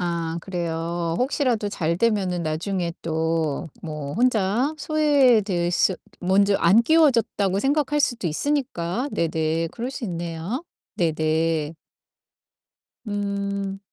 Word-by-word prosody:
아, 170 -2 -2
그래요. 170 -2 -2
혹시라도 250 -5 0
잘되면은 180 +1 0
나중에 170 +3 -2
또 160 -1 -1
뭐 150 -3 -5
혼자 235 +4 +2
소외될 255 - +3
수 180 +1 +2 0.2
먼저 195 +2 +3
안 195 +7 +5
끼워줬다고 235 - +3
생각할 295 +2 +1
수도 240 -8 0
있으니까 245 - -1
네네 160 0 0
그럴 240 +2 -4
수 270 -2 -6
있네요. 170 - -4 0.3
네네. 160 -1 0 1.3
음. 200 -1 -3
190 Hz, 220 characters per minute, -23 LUFS, 165-235 Hz, 1.3 s, 안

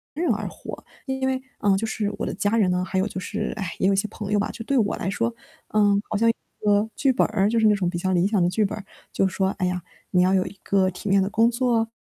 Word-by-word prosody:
人 335 +3 0
而 - - -3
活， - - -9 0.2
因 265 -1 -2
为， 265 0 0 0.2
啊， 200 -1 +3
就 225 +3 -2
是 210 -2 -2
我 - - -2
的 - - -3
家 205 +4 0
人 200 -4 +3
呢， 180 0 +1
还 190 0 -1
有 190 - +1
就 205 - -7
是， 210 +3 -3
唉， 190 -6 -4
也 190 - +3
有 195 - +3
些 205 +2 0
朋 210 -1 -5
友 210 - +4
吧， 205 - -1
就 225 - -8
对 275 - +1
我 215 -4 +2
来 190 - -2
说， 230 +4 -1 0.4
呃， 205 -1 +3
好 215 - 0
像 230 +2 +4
一 - - +3 0.3
个 205 +1 +3
剧 270 -2 +3
本 245 - +3
儿， 205 -2 +1
就 230 0 +2
是 220 - +5
那 210 - +5
种 185 -3 0
比 175 - -3
较 190 +2 -1
理 180 +1 +3
想 205 -2 +1
的 175 - +3
剧 215 +3 +1
本 200 - -3
儿， 210 - -7 0.3
就 - - +2
是 190 - -1
说， 190 -1 +2
哎 185 - +1
呀， 180 0 -2 0.3
你 180 - +4
要 185 +1 +3
有 185 -1 +2
一 195 - -9
个 190 -1 +2
体 185 +3 -8
面 195 0 +4
的 195 - -1
工 225 +2 +3
作。 235 -2 +1
205 Hz, 320 characters per minute, -24 LUFS, 190-225 Hz, 0.4 s, 是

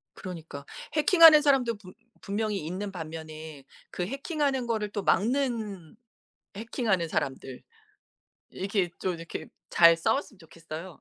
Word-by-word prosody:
그러니까. 165 -6 -8 0.3
해킹하는 320 -1 +8
사람도 260 -6 +2
분 185 -3 -14 0.3
분명히 205 -3 -2
있는 195 +4 -4
반면에 155 -3 -8 0.3
그 180 - -3
해킹하는 275 - -1
거를 220 -3 -1
또 205 0 -4
막는 220 - 0 0.6
해킹하는 215 -5 -1
사람들. 135 -3 -3 0.9
이렇게 195 -2 -1
좀 185 -1 -1
이렇게 165 0 -7 0.2
잘 170 -1 +7
싸웠으면 225 +4 -1
좋겠어요. 165 +1 -10
195 Hz, 290 characters per minute, -28 LUFS, 165-235 Hz, 0.9 s, 해킹하는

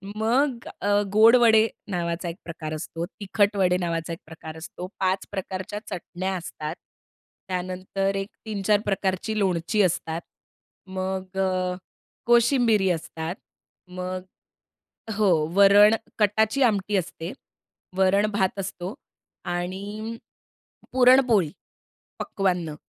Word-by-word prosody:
मग 240 +3 +1
अ, 205 0 +3
गोड 220 +3 +7
वडे 225 -2 +6 0.2
नावाचा 170 0 -2
एक 165 - -6
प्रकार 160 -2 -6
असतो, 165 +2 -5
तिखट 205 +1 0
वडे 180 -2 +3
नावाचा 170 -2 -2
एक 165 - -8
प्रकार 160 0 -9
असतो. 175 +2 -7
5 190 0 0
प्रकारच्या 190 +1 -4
चटण्या 185 0 -4
असतात. 155 -3 -5 0.7
त्यानंतर 185 +2 -2
एक 195 +1 -3 0.2
3-4 210 -1 +1
प्रकारची 200 +2 -1
लोणची 190 +2 +1
असतात. 165 -2 -1 0.7
मग 190 0 -4
अ, 185 -1 0 0.5
कोशिंबिरी 235 -4 +4
असतात. 165 +1 -4 0.5
मग 185 0 -5 1.0
हो. 210 -3 +4 0.2
वरण, 200 +2 +7 0.2
कटाची 220 +5 +2
आमटी 205 -3 +1
असते. 170 -1 -4 0.7
वरण-भात 195 0 +2
असतो 185 0 -5 0.6
आणि 200 +6 -4 0.8
पुरणपोळी, 250 - +5 0.7
पक्वांन्न. 180 -5 -1
190 Hz, 100 wpm, -25 LUFS, 180-210 Hz, 1.0 s, गोड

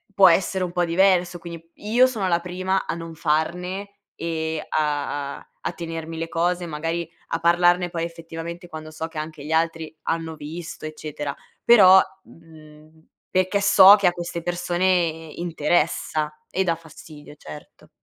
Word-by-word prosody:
può 195 -2 +8
essere 185 +2 +1
un 180 - -3
po' 175 0 0
diverso, 180 0 +3
quindi 165 -1 -10
io 235 +5 +3
sono 220 -7 -2
la 170 -1 +2
prima 185 +2 -2
a - - -3
non 165 -1 -8
farne 180 +6 -2 0.2
e 160 -1 -3
a 145 -2 -1
a - - -14 0.2
a - - -2
tenermi 165 -1 -6
le 165 0 -4
cose, 175 +1 0
magari 165 +1 -3 0.2
a 165 - -2
parlarne 175 +1 +3
poi 165 -1 -3
effettivamente 170 +1 -8
quando 155 -1 -8
so 160 +1 -5
che 160 - -11
anche 155 -1 -6
gli 150 - -6
altri 165 -1 0
hanno 165 -1 -2
visto, 155 +2 -8
eccetera, 150 -2 -5 0.3
però, 190 -5 +8 0.2
mhmm, 155 -1 -18 0.2
perché 185 +2 +1
so 200 0 +9
che 200 -3 +2
a 175 - +3
queste 170 -1 -5
persone 175 +1 -1 0.5
interessa 155 -2 0 0.2
e 190 - 0
dà 170 -3 +1
fastidio, 155 -2 -14
certo. 75 - -13
165 Hz, 155 wpm, -23 LUFS, 160-180 Hz, 0.5 s, so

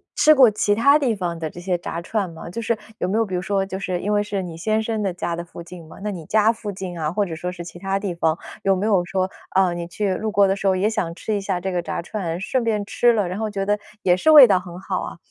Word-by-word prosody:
吃 310 0 +6
过 255 -5 +7
其 205 0 +1
它 280 +7 +5
地 245 -6 +1
方 175 -4 -3
的 160 -1 -3
这 175 - -11
些 180 +1 -1
炸 170 -1 -5
串 195 +2 -2
吗？ 165 -1 -10
就 180 +7 -5
是 230 +1 0 0.2
有 - - 0
没 205 - 0
有 225 - +2
比 190 - -8
如 180 - 0
说 195 0 0
就 190 0 -5
是 185 -2 -2
因 210 +3 -1
为 205 - +3
是 205 -2 -3
你 170 -2 -7
先 215 +6 0
生 220 -1 -2
的 195 -3 0
家 175 -1 -3
的 170 - -5
附 170 0 -10
近 175 0 -11
嘛， - - -13
那 210 - -2
你 175 -4 -7
家 215 +1 +4
附 220 -2 -6
近 185 -2 -6
啊， 155 0 -1
或 205 +2 0
者 165 -4 -5
说 180 +3 -4
是 175 -1 -8
其 175 +1 -10
它 195 +1 -1
地 195 -2 -3
方， 165 -1 0 0.2
有 195 -1 +3
没 190 +3 -2
有 200 -5 +3
说， 185 +1 -2 0.2
呃， 190 -2 +4
你 170 0 -5
去 195 +2 -1
路 215 +3 -2
过 200 -2 +4
的 195 - +1
时 195 - -2
候 190 - +3
也 190 +3 +1
想 185 -7 -2
吃 215 - -3
一 200 - -1
下 195 -2 -2
这 190 +2 -3
个 175 -1 -1
炸 170 - -4
串， 175 -3 -4
顺 245 +6 -1
便 215 -3 0
吃 240 +4 +3
了， 210 -5 +1
然 185 +3 -4
后 220 -1 -1
觉 195 -1 -3
得 205 +1 +1 0.2
也 180 -1 +4
是 185 - +1
味 300 -4 +11
道 200 -5 +3
很 180 -1 -10
好 190 0 -3
啊？ - - -7
195 Hz, 330 characters per minute, -22 LUFS, 175-210 Hz, 0.2 s, 味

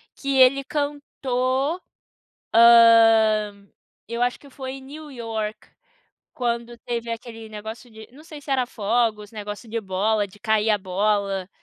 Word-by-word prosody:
que 275 -1 -2
ele 270 +2 +5
cantou, 285 +1 -2 0.7
hã, 225 -3 +6 0.4
eu 235 +2 -4
acho 245 0 0
que 280 - -16
foi 265 0 -7
New 295 +3 -10
York, 220 -3 -5 0.7
quando 235 -1 -3
teve 235 -1 -3
aquele 225 -1 -8
negócio 220 +2 -9
de 220 0 -12
não 285 +5 -16
sei 310 -2 -10
se 280 - -7
era 255 -2 +2
fogos, 215 -1 -1
negócio 210 +1 -7
de 230 0 -3
bola, 205 +2 0
de 200 +2 -19
cair 220 +1 +1
a 210 - +3
bola, 195 0 -1
230 Hz, 140 wpm, -23 LUFS, 215-255 Hz, 0.7 s, hã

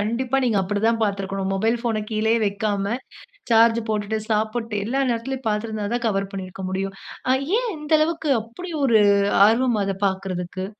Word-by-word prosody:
கண்டிப்பா 235 +5 -1
நீங்க 230 -4 +1
அப்டி 200 +2 -2
தா - - +5
பாத்து 200 -2 0
இருக்கணும். 195 0 -3
மொபைல் 225 +5 +1
ஃபோன 225 -3 -1
கீழயே 220 +1 +2
வக்காம, 200 +1 -1 0.6
சார்ஜ் 230 0 +5
போட்டுட்டு, 215 0 -1
சாப்பிட்டு. 220 +1 -1
எல்லா 260 +5 -1
நேரத்திலும் 255 +2 -3
பாத்து 210 +1 -1
இருந்தாதா, 220 +2 -2
கவர் 195 -2 -1
பண்ணியிருக்க 190 0 -6
முடியும். 195 +1 -3 0.6
ஏன்? - - -2
இந்த 300 0 -9
அளவுக்கு, 315 -1 0
அப்படி 235 +12 -9
ஒரு 230 -4 +5 0.5
ஆர்வம் 235 0 +2
அத 195 0 -2
பாக்குறதுக்கு. 185 -1 -4
215 Hz, 155 wpm, -23 LUFS, 195-235 Hz, 0.6 s, தா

